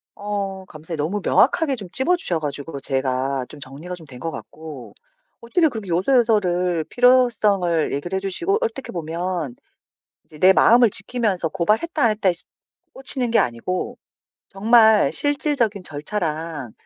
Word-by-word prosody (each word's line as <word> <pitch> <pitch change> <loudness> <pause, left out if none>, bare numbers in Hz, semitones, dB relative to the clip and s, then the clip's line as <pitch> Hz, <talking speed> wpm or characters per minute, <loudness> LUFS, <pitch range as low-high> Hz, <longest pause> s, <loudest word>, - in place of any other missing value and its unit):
어 200 -2 -4
감사해요. 160 0 -8
너무 180 +8 -2
명확하게 280 - +3
좀 200 -6 -9
짚어주셔 265 - +1
가지고 145 0 -5
제가 130 -1 -1
좀 150 - -12
정리가 145 +7 -8
좀 165 -3 -13
된 125 -2 -12
것 165 +2 -4
같고. 155 -7 -10 0.5
어떻게 320 +8 +1
그렇게 220 -6 -7
요소요소를 180 - +1
필요성을 210 - +2
얘기를 175 +7 -3
해주시고 195 - -1
어떻게 455 - -4
보면 170 -3 -4 0.7
이제 155 - -16
내 190 +1 +6
마음을 235 +2 +5
지키면서 200 -5 0
고발했다 220 - 0
안 230 - +5
했다에 205 -3 +1
씁 175 - -9 0.5
꽂히는 255 -2 0
게 230 - +4
아니고 120 +10 -2 0.5
정말 220 +2 +4
실질적인 280 -8 0
절차랑 155 - -4
185 Hz, 325 characters per minute, -21 LUFS, 160-230 Hz, 0.7 s, 내